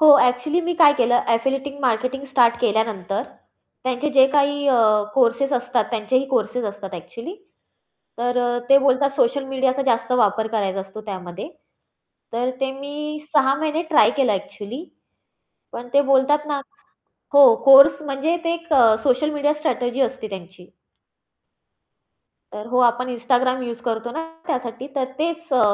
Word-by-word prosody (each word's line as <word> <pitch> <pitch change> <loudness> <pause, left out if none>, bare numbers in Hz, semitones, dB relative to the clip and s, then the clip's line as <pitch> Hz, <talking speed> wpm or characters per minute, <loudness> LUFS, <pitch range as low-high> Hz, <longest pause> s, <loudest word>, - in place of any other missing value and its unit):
हो, 310 - +6
ॲक्चुअली 250 +7 +1
मी 350 0 -3
काय 315 -3 +6
केलं 245 0 +2
एफिलिएटिंग 270 +4 -3
मार्केटिंग 255 +2 -1
स्टार्ट 240 -3 +3
केल्यानंतर 215 -3 -1 0.6
त्यांचे 255 +3 -2
जे 265 -2 +5
काही 285 0 +1
अ, 255 -3 +3 0.4
कोर्सेस 260 +2 +1
असतात, 245 -1 0
त्यांचेही 245 +4 -1
कोर्सेस 250 -1 -1
असतात 200 -2 -7
ॲक्चुअली 230 - -9 0.8
तर 245 +1 -1
अ, 245 0 0
ते 275 0 +7
बोलतात 275 0 +2
सोशल 275 +1 +1
मीडियाचा 265 0 -1
जास्त 235 0 0
वापर 220 -3 +1
करायचा 200 -4 -2
असतो 195 +3 -10
त्यामध्ये. 190 - -8 0.8
तर 245 +2 -1
ते 270 0 -1
मी 300 +2 -6 0.2
6 270 0 +4
महिने 315 +1 -1
ट्राय 310 - +5
केलं 260 -6 +2
ॲक्चुअली 210 - -6 0.9
पण 245 - -8
ते 280 - +5
बोलतात 275 +2 +2
ना 285 -1 -2 0.7
हो 275 -5 +8
कोर्स 275 +1 +7
म्हणजे 295 +3 -2
ते 335 - 0
एक 335 -1 -8
अ, 230 -5 +5
सोशल 270 +3 +1
मीडिया 295 0 0
स्ट्रॅटेजी 255 -4 -2
असते 260 -3 -2
त्यांची. 185 -2 -11 1.9
तर 210 - -8
हो, 250 - +1
आपण 245 +1 +2
Instagram 255 +2 0
यूज 235 0 -6
करतो 230 0 -3
ना 320 - -4 0.3
त्यासाठी 250 0 -4
तर 265 - +1
तेच 330 0 -4
अ, 255 - +3
255 Hz, 150 wpm, -21 LUFS, 230-280 Hz, 1.9 s, हो